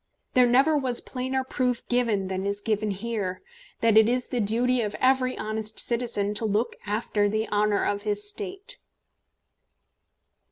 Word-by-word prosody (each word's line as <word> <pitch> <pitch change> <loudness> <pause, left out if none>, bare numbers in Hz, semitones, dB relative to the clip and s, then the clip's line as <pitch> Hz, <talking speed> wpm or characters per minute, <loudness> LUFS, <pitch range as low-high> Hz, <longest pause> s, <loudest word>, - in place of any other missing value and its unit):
There 250 -1 +5
never 270 +6 +4
was 260 -4 +1
plainer 260 +1 -3
proof 250 -2 -2
given 230 -6 +1
than 190 0 -3
is 200 0 -2
given 215 0 -1
here, 200 -2 -3 0.4
that 225 -1 +6
it 220 +1 +4
is 250 0 0
the 250 - -1
duty 240 +4 +1
of 210 -2 -3
every 255 0 +2
honest 215 0 -3
citizen 230 -4 +1
to 210 - 0
look 215 +3 0
after 205 -1 0
the 215 +1 -1
honour 210 0 +1
of 205 0 -1
his 205 -1 +1
State." 395 - -4
225 Hz, 155 wpm, -26 LUFS, 205-250 Hz, 0.4 s, that